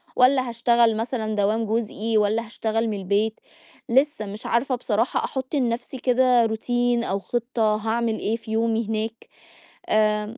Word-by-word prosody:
والّا 255 Hz, 0 st, +4 dB
هاشتغل 235 Hz, -1 st, +3 dB
مثلًا 225 Hz, -2 st, -2 dB
دوام 210 Hz, +2 st, +1 dB
جزئي، 220 Hz, 0 st, -1 dB
والّا 215 Hz, +2 st, +1 dB
هاشتغل 225 Hz, 0 st, -2 dB
من 210 Hz, -, -2 dB
البيت، 205 Hz, +3 st, 0 dB, 0.5 s
لِسّّه 265 Hz, -2 st, +2 dB
مش 205 Hz, +1 st, -9 dB
عارفة 255 Hz, +3 st, +1 dB
بصراحة 230 Hz, 0 st, 0 dB
أحُطّ 265 Hz, +2 st, -4 dB
لنفسي 240 Hz, 0 st, -1 dB
كده 250 Hz, -1 st, +3 dB
روتين 240 Hz, +2 st, 0 dB
أو 195 Hz, -3 st, -1 dB
خطة 230 Hz, 0 st, 0 dB
هاعمل 225 Hz, +1 st, -1 dB
إيه 220 Hz, -, -1 dB
في 225 Hz, -1 st, -10 dB
يومي 225 Hz, 0 st, 0 dB
هناك، 220 Hz, +1 st, -4 dB, 0.6 s
آمم 215 Hz, +2 st, +1 dB
225 Hz, 145 wpm, -24 LUFS, 215-240 Hz, 0.6 s, والّا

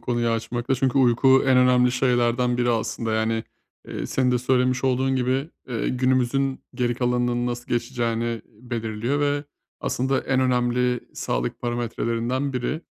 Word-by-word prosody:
konuyu 120 Hz, -1 st, -1 dB
açmakta 120 Hz, +3 st, -1 dB
çünkü 135 Hz, +1 st, +1 dB
uyku 130 Hz, +1 st, +5 dB
en 130 Hz, -1 st, +5 dB
önemli 125 Hz, -1 st, +4 dB
şeylerden 125 Hz, -1 st, +1 dB
biri 120 Hz, 0 st, +1 dB
aslında. 115 Hz, 0 st, -1 dB
Yani, 110 Hz, 0 st, 0 dB, 0.4 s
eee, -, -, -4 dB
senin 130 Hz, -1 st, +1 dB
de 125 Hz, -, +2 dB
söylemiş 125 Hz, +1 st, +1 dB
olduğun 130 Hz, +1 st, +1 dB
gibi, 130 Hz, +4 st, 0 dB, 0.2 s
eee, 115 Hz, -3 st, -2 dB
günümüzün 130 Hz, +1 st, 0 dB
geri 120 Hz, -1 st, 0 dB
kalanının 120 Hz, 0 st, 0 dB
nasıl 120 Hz, 0 st, -4 dB
geçeceğini 120 Hz, -2 st, -2 dB, 0.2 s
belirliyor 120 Hz, +2 st, -2 dB
ve 145 Hz, 0 st, 0 dB, 0.4 s
aslında 130 Hz, +2 st, 0 dB
en 130 Hz, -1 st, 0 dB
önemli 125 Hz, -1 st, +1 dB
sağlık -, -, -2 dB
parametrelerinden 120 Hz, +2 st, -2 dB
biri. 125 Hz, +5 st, -2 dB
125 Hz, 140 wpm, -24 LUFS, 120-130 Hz, 0.4 s, uyku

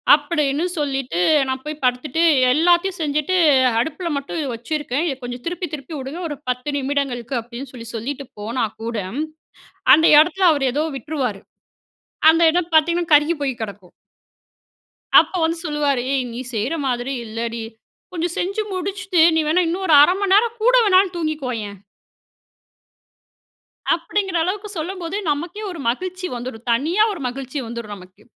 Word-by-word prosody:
அப்படின்னு 295 Hz, 0 st, -1 dB
சொல்லிட்டு 270 Hz, -, -2 dB, 0.3 s
நான் 260 Hz, 0 st, -3 dB
போய் 305 Hz, -1 st, -6 dB
படுத்துட்டு 275 Hz, +7 st, 0 dB, 0.3 s
எல்லாத்தையும் 350 Hz, +4 st, +2 dB
செஞ்சுட்டு 300 Hz, +4 st, 0 dB, 0.4 s
அடுப்பில 320 Hz, +7 st, -2 dB
மட்டும் 280 Hz, +4 st, -4 dB
வச்சுருக்கேன். 295 Hz, +4 st, -2 dB
இதை 270 Hz, -5 st, -2 dB
கொஞ்சம் 245 Hz, 0 st, -6 dB
திருப்பி 355 Hz, +1 st, -3 dB
திருப்பி 290 Hz, +2 st, -7 dB
விடுங்க 280 Hz, +7 st, -6 dB
ஒரு 295 Hz, -, -5 dB
10 250 Hz, +4 st, -2 dB
நிமிடங்களுக்கு 270 Hz, -3 st, -2 dB
அப்படின்னு 240 Hz, +3 st, -9 dB
சொல்லி 230 Hz, -2 st, -9 dB
சொல்லிட்டு 275 Hz, +5 st, -5 dB
போனா 230 Hz, +3 st, -1 dB, 0.2 s
கூட, 230 Hz, 0 st, -4 dB, 1.0 s
அந்த 320 Hz, +1 st, +4 dB
இடத்தில 360 Hz, +3 st, +4 dB
அவர் 270 Hz, -3 st, +1 dB
ஏதோ 300 Hz, +4 st, 0 dB
விட்டுருவாரு. 260 Hz, -10 st, -3 dB, 0.9 s
அந்த 330 Hz, -, +1 dB
இடம் 350 Hz, -1 st, -1 dB
பார்த்தீங்கன்னா 335 Hz, +1 st, +2 dB
கருகி 300 Hz, +3 st, +3 dB
போய் 265 Hz, -4 st, -2 dB
கெடக்கும். 200 Hz, -4 st, -7 dB, 1.3 s
அப்போ 370 Hz, -, 0 dB
வந்து 330 Hz, +1 st, 0 dB
சொல்லுவாரு, 290 Hz, -4 st, 0 dB
"ஏய்! 265 Hz, -2 st, +1 dB
நீ 240 Hz, -, -6 dB
செய்ற 225 Hz, +8 st, -1 dB
மாதிரி 245 Hz, +2 st, -2 dB
இல்லடி. 230 Hz, +1 st, -4 dB, 0.5 s
கொஞ்சம் 345 Hz, 0 st, -2 dB
செஞ்சு 395 Hz, +4 st, -1 dB
முடிச்சிட்டு 370 Hz, -1 st, -1 dB
நீ 320 Hz, -, +3 dB
வேணா 350 Hz, +3 st, +3 dB
இன்னும் 375 Hz, +3 st, -2 dB
ஒரு 310 Hz, -, +6 dB
1/2 325 Hz, +5 st, +6 dB
மணி 390 Hz, -1 st, +2 dB
நேரம் 460 Hz, +2 st, +2 dB
கூட -, -, +4 dB
வேணாலும் 375 Hz, -2 st, +4 dB
தூங்கிக்கோயேன்" 250 Hz, -, -3 dB, 2.2 s
அப்பிடிங்கிற 370 Hz, +1 st, -2 dB
அளவுக்கு 405 Hz, +4 st, -3 dB
சொல்லும்போது 360 Hz, +3 st, -4 dB
நமக்கே 345 Hz, +8 st, -4 dB
ஒரு 340 Hz, -, -8 dB
மகிழ்ச்சி 370 Hz, +8 st, -3 dB
வந்துரும். 240 Hz, -1 st, -7 dB
தனியா 320 Hz, -, +2 dB
ஒரு 345 Hz, -, -8 dB
மகிழ்ச்சி 260 Hz, +2 st, -6 dB
வந்துரும் 230 Hz, -3 st, -6 dB
நமக்கு. 185 Hz, +2 st, -16 dB
295 Hz, 140 wpm, -21 LUFS, 250-345 Hz, 2.2 s, ஒரு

